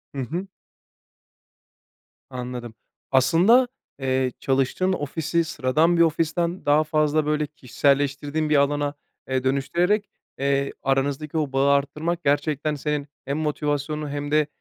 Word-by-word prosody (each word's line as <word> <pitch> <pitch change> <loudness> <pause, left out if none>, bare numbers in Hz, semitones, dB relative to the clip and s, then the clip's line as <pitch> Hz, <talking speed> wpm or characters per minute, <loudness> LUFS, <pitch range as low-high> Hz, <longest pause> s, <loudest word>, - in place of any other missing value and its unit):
Hı 135 - -2
hı. 170 +10 -4 1.8
Anladım. 125 -2 -6 0.4
Aslında, 175 - +5 0.3
eee, 130 -1 0
çalıştığın 135 +8 +1
ofisi 160 +1 -1
sıradan 155 +3 +1
bir - - +4
ofisten 170 +2 +1
daha 145 +2 +4
fazla, 155 0 +1
böyle, 150 0 0
kişiselleştirdiğin 145 +1 0
bir 150 - +3
alana, 145 +1 +1 0.3
eee, 130 -1 -1
dönüştürerek, 175 +10 +1 0.3
eee, 140 0 0
aranızdaki 140 +3 0
o 150 -3 -1
bağı 135 +1 +3
arttırmak 150 +5 0
gerçekten 145 +1 0
senin 150 0 -2 0.2
hem 140 +3 -2
motivasyonunu 150 0 -2
hem 145 0 -4
de 150 -1 +3
145 Hz, 120 wpm, -24 LUFS, 140-155 Hz, 1.8 s, Aslında